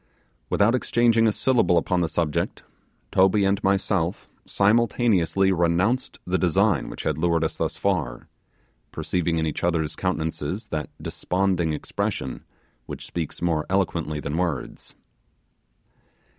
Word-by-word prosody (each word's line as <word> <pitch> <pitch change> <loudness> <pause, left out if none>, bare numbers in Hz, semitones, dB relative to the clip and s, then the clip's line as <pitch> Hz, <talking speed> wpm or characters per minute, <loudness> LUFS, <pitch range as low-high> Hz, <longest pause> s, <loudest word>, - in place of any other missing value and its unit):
Without 105 +3 +3
exchanging 120 -2 +3
a - - +4
syllable 120 -6 +2
upon 90 +2 +1
the 85 - 0
subject, 80 -2 -1 0.5
Toby 95 +2 +4
and 100 +1 +1
myself 95 -3 0 0.2
simultaneously 100 -4 +2
renounced 90 +8 +1
the 90 +1 0
design 85 -4 +2
which - - -7
had 75 0 -1
lured 85 0 +2
us 80 - -1
thus - - -2
far - - -1 0.6
perceiving 85 -2 -1
in 80 - 0
each 75 - -3
other's 85 -3 0
countenances 80 +6 -2
that 75 -1 -3
desponding 90 -3 0
expression 65 -3 -3 0.4
which - - -7
speaks 85 0 -5
more 80 -3 +1
eloquently 85 -5 0
than 75 +2 -3
words. 85 -7 -3
90 Hz, 125 wpm, -24 LUFS, 80-100 Hz, 0.6 s, a